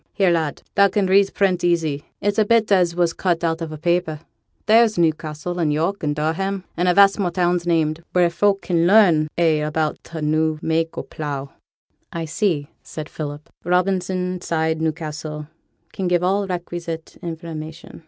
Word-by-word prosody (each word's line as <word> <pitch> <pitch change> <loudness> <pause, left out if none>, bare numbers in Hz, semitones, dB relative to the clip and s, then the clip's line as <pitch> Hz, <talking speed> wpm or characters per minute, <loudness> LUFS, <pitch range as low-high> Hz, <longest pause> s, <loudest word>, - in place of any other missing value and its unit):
Here, 190 -3 +3
lad, 160 -3 -1
thou 200 - +5
can 200 +1 0
read 195 +1 +4
print 185 -3 +1
easy; 160 -5 0 0.2
it's 205 +2 0
a - - +6
bit 225 0 +2
as 180 -3 +3
was 175 -1 +1
cut 175 -3 -1
out 165 0 0
on 165 -1 -4
a 155 - -6
papper; 170 -1 0 0.4
there's 220 -1 +4
Newcassel, 160 +1 -1
and 160 -3 +1
York, 165 +7 -1
and 145 -1 -1
Durham, 185 +6 -2
and 175 +1 0
a 180 - +4
vast 200 +1 +6
more 185 -3 +1
towns 175 0 0
named, 160 -1 +1
wheere 175 -1 +3
folk 200 +3 +1
can 170 -2 +1
learn 180 -7 +5
a' 165 -3 +3
about 155 0 -2
t' 165 - -8
new 155 +1 +1
mak' 160 0 -1
o' - - -3
pleugh.' 140 -3 -5 0.6
'I 165 -1 -3
see,' 160 -3 -1
said 155 -1 -8
Philip: 145 -1 -6 0.2
'"Robinson, 180 0 0
Side, 160 -1 -1
Newcastle, 155 -1 -4 0.5
can 190 - -2
give 175 0 +2
all 195 +2 +1
requisite 170 -2 -5
information."' 160 -2 -7
170 Hz, 175 wpm, -21 LUFS, 155-185 Hz, 0.6 s, a